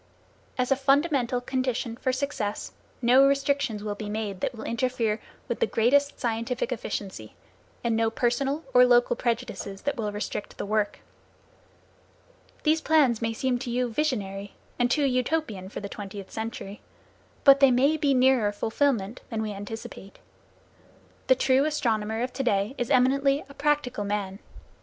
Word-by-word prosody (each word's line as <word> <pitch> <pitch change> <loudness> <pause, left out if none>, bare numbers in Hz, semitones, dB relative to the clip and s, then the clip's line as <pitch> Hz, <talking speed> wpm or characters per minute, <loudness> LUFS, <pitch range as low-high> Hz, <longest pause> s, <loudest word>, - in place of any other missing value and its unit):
As 250 +1 0
a - - +6
fundamental 275 -2 +2
condition 255 -2 -2
for 260 +2 -1
success, 255 -6 -3 0.3
no 255 +3 +6
restrictions 275 -6 0
will 210 -1 -2
be 205 0 -6
made 210 -3 -3
that - - -2
will 220 - -8
interfere 235 -3 -1 0.3
with - - -3
the 465 - +2
greatest 280 +5 +2
scientific 235 +2 -2
efficiency, 195 - -5 0.5
and 230 -1 +1
no 225 0 +2
personal 270 +6 0
or - - +8
local - - +4
prejudices 230 - -3
that 285 -1 -1
will 210 -2 -2
restrict 205 0 -5
the - - -4
work. 210 0 -1 1.6
These 315 +1 +3
plans 285 -9 +3
may 230 0 0
seem 245 +2 -1
to 245 - -5
you 245 -1 -1
visionary, 205 -9 -2 0.2
and 245 0 +3
too 295 +4 +2
Utopian 250 -6 -1
for - - -6
the 200 - -5
twentieth 200 -1 -8
century. 220 -2 -6 0.6
But 275 -1 +8
they 275 -1 +7
may 265 +5 +3
be 290 -3 +2
nearer 255 -5 +4
fulfilment 220 0 -1
than 220 -2 -2
we 215 - -3
anticipate. 200 -1 -8 1.1
The 260 - +6
true 260 +1 +3
astronomer 225 -7 0
of 250 - -4
to 270 - -2
day 205 -1 +1
is 245 -3 -3
eminently 275 +3 +3
a 280 - -13
practical 285 -6 0
man. 200 -1 -3
245 Hz, 155 wpm, -26 LUFS, 215-275 Hz, 1.6 s, or